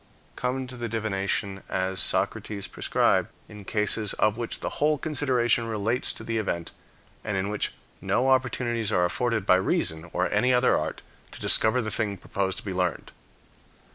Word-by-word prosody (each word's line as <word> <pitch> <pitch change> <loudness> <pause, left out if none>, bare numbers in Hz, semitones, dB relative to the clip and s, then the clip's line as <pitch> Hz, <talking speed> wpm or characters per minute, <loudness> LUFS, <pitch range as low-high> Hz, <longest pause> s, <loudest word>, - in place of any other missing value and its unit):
Come 130 +1 -2
to 125 -2 -5
divination, 100 -2 -2
as 95 0 -1
Socrates 100 +3 +1
prescribed, - - +2 0.2
in 105 -2 -11
cases 105 0 0
of 105 0 +2
which 115 0 -3
the - - -4
whole 150 0 +4
consideration 130 -5 +1
relates 110 +3 0
to - - -9
the 115 0 -1
event, 85 -5 -3 0.5
and 105 -2 -2
in 95 +1 -1
which 105 0 -1 0.3
no 130 - +1
opportunities 120 -4 +1
are 90 -4 +3
afforded 115 +2 0
by 95 - +6
reason, 80 -3 -1
or - - +1
any 125 0 +3
other 125 +1 +4
art, 80 +1 -3 0.3
to - - -9
discover 120 +3 +3
the 110 - -3
thing 105 -3 -1
proposed 95 -1 -2
to - - -8
be 95 - -3
learned. 90 -3 -1
110 Hz, 165 wpm, -26 LUFS, 95-120 Hz, 0.5 s, by